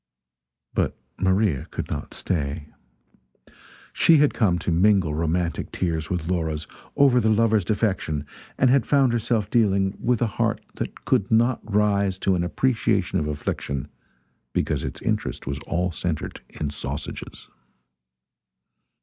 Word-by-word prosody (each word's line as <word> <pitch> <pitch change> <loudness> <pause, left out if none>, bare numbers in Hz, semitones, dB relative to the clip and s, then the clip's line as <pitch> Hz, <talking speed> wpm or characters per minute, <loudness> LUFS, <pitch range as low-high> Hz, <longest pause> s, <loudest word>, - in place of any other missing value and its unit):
But - - 0 0.2
Maria 95 -6 +1
could - - -5
not - - -5
stay. 75 -3 -2 1.2
She 165 - +5
had 145 0 +4
come 95 -7 +2
to 85 +1 -2
mingle 90 -2 +3
romantic 85 +2 -1
tears 80 -3 -2
with 90 -3 -2
Laura's 80 -4 -1 0.3
over 135 -3 +5
the 110 -2 +2
lover's 110 -1 +3
defection 95 -7 -1 0.3
and 125 -1 +4
had 135 -2 +4
found 135 -4 +4
herself 110 -2 0
dealing 100 -4 +2
with 120 -2 +2
a 110 - -2
heart - - +1 0.2
that - - -6
could 100 - +2
not 115 +2 +3
rise 100 -2 +2
to 95 0 +1
an 90 -1 +1
appreciation 110 -1 +1
of 75 - -2
affliction 75 -1 -3 0.6
because - - 0
its - - -5
interest - - -2
was 70 +1 -3
all 90 +1 0
centred 80 -1 -3
in 75 -2 -4
sausages. 70 - -6
95 Hz, 135 wpm, -24 LUFS, 80-110 Hz, 1.2 s, She